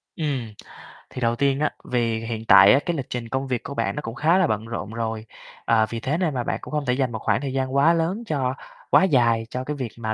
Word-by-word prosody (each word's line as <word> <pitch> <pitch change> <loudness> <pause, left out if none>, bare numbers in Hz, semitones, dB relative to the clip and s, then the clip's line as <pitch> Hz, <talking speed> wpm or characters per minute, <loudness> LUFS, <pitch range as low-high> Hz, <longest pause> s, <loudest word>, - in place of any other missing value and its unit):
Ừm. 135 -8 -3 0.6
Thì 125 - -8
đầu 115 0 +1
tiên 140 +2 +1
á, 150 0 +2 0.2
vì 115 -2 0
hiện 115 -1 -5
tại 100 - +8
á, 135 - +5
cái 175 - -1
lịch 135 - -5
trình 120 -2 -5
công 135 +2 -2
việc 125 -3 -2
của 140 - -6
bạn - - -1
nó 150 - -3
cũng 115 -5 -7
khá 160 +6 +3
là 190 -3 +3
bận 110 -3 -2
rộn 115 -3 -5
rồi, 115 -1 -3 0.4
ờ, 110 -1 +3
vì 115 - -4
thế 135 +7 -1
nên 170 -4 0
là 125 -2 -2
bạn - - -2
cũng - - -10
không 150 -1 -2
thể 125 - +1
dành 130 -1 0
một 110 - -4
khoảng 105 +2 0
thời 135 -2 -4
gian 130 0 -2
quá 145 +5 +5
lớn 170 +7 -1
cho 135 - -1 0.4
quá - - +5
dài 120 -9 +3
cho 125 +1 -4
cái 150 +3 -4
việc 130 -5 -5
mà 110 -2 -2
130 Hz, 270 wpm, -23 LUFS, 115-145 Hz, 0.6 s, tại